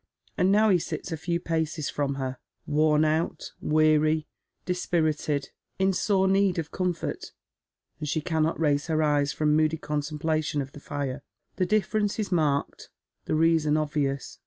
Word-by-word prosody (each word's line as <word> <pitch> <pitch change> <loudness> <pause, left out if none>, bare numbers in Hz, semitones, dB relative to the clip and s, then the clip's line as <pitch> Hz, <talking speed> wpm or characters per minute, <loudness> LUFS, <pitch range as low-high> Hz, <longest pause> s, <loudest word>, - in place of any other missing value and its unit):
And 185 0 +3
now 215 +1 +5
he 180 - +4
sits 160 -1 -5
a - - -1
few 170 +2 -2
paces 160 -3 -2
fi - - -4
om 140 -1 0
her, 130 -1 -4 0.3
worn 155 +1 +3
out, 160 +2 -1
weary, 155 0 +3 0.4
dispirited, 155 -5 -1 0.3
in 190 0 +2
sore 190 +1 +2
need 195 -1 +3
of 160 -2 -3
comfort, 180 -2 -3 0.7
and 150 -2 -4
she 155 - 0
cannot 160 0 0
raise 145 -2 +1
her 155 -1 +1
eye» 145 -1 +3
from 150 +1 +1
moody 155 +1 +2
contemplation 150 0 -2
of 135 -1 -4
the 145 - -11
fire. 140 -1 -4 0.4
The 185 - +1
difference 210 -1 +1
is 210 -3 -3
marked, 150 -5 0 0.4
the - - 0
reason 160 -1 +3
obvious. 145 -3 -2
155 Hz, 160 wpm, -27 LUFS, 150-175 Hz, 0.7 s, now